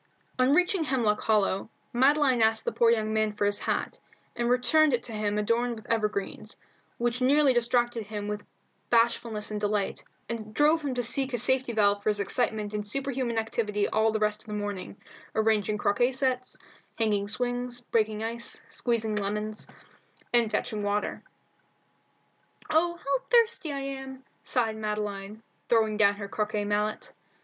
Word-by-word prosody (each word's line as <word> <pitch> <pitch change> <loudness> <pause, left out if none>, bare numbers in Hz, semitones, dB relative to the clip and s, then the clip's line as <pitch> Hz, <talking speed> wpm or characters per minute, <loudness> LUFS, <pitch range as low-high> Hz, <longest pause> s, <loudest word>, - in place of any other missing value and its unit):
On 255 +1 +4
reaching 360 +2 +3
Hemlock 230 -7 +1
Hollow, 205 -2 +1 0.2
Madeline 265 0 +4
asked 220 0 +3
the - - 0
poor 235 - +3
young 220 -2 +1
man 215 -1 +1
for 210 -1 -1
his 205 0 +2
hat, - - -2 0.4
and 240 0 0
returned 250 +4 +4
it 235 - -5
to - - -6
him 210 -1 -1
adorned 230 +3 +1
with 220 - -12
evergreens, 210 -3 -2 0.4
which 240 +1 -1
nearly 275 +1 +5
distracted 240 -2 +1
him 210 -1 -5
with 210 0 -4 0.5
bashfulness 230 -2 +1
and 210 -1 -3
delight, 205 -1 -1 0.2
and 215 -2 -6
drove 305 +2 +4
him 270 -3 -2
to 245 - 0
seek 265 +3 0
a - - +1
safety 260 +1 0
valve 205 -2 +2
for 210 - 0
his 210 -1 0
excitement 215 0 -1
in 210 - -1
superhuman 255 +2 -2
activity 215 -2 0
all 220 0 +2
the 220 - 0
rest 210 0 0
of - - -10
the 210 - -4
morning, 205 -1 -5 0.4
arranging 215 -1 +2
croquet 210 +5 +2
sets, 255 -1 0 0.4
hanging 210 -3 +1
swings, 245 +2 -2
breaking 220 -2 0
ice, 235 +1 -4
squeezing 225 -3 -1
lemons, 210 +1 -3 0.7
and 235 -2 +4
fetching 210 0 -2
water. 205 0 -1 1.5
"Oh, 340 +2 +3
how 275 -5 -2
thirsty 460 -9 +3
I 275 -1 -3
am!" 270 -1 -6 0.2
sighed 225 -4 0
Madeline, 210 0 -4 0.3
throwing 220 -2 +3
down 205 -1 +4
her 200 -1 -6
croquet 210 0 -2
mallet. 210 +1 -1
225 Hz, 160 wpm, -28 LUFS, 210-250 Hz, 1.5 s, nearly